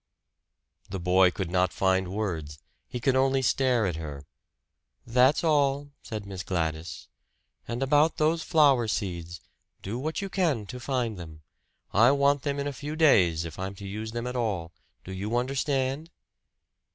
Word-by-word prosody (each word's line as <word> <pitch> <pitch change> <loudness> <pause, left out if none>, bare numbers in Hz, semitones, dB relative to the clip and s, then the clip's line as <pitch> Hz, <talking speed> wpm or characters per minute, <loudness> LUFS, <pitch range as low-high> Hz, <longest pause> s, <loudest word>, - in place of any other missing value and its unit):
The 95 - -4
boy 90 +1 +4
could 90 -1 -4
not 90 0 +2
find 95 -1 +1
words. 90 -7 -4 0.3
He 125 - -5
could 130 +1 +1
only 135 0 +2
stare 125 -3 +2
at 90 -4 -2
her. 75 -3 -7 0.8
"That's 125 +6 +3
all," 145 -2 +2
said 110 -3 -6
Miss 95 -2 -6
Gladys. 80 -4 -3 0.6
"And 120 +2 -2
about 150 +4 +3
those 160 +2 +2
flower 140 -9 +4
seeds 85 -6 -4 0.4
do 110 +6 -4
what 155 +4 -3
you 200 - -3
can 165 - 0
to 125 +5 -8
find 120 -4 -2
them. 80 -2 -10 0.5
I 115 +4 +6
want 140 0 +3
them 140 0 -2
in 140 - -2
a 145 - -3
few 145 +3 -6
days, 90 - +4
if 80 0 -8
I'm 95 +1 -4
to 100 +1 -8
use 110 +3 -5
them 120 +1 -4
at 125 0 -4
all. 100 -9 -2 0.3
Do 95 - -9
you 105 +5 -2
understand?" 135 +3 -1
115 Hz, 165 wpm, -27 LUFS, 95-140 Hz, 0.8 s, I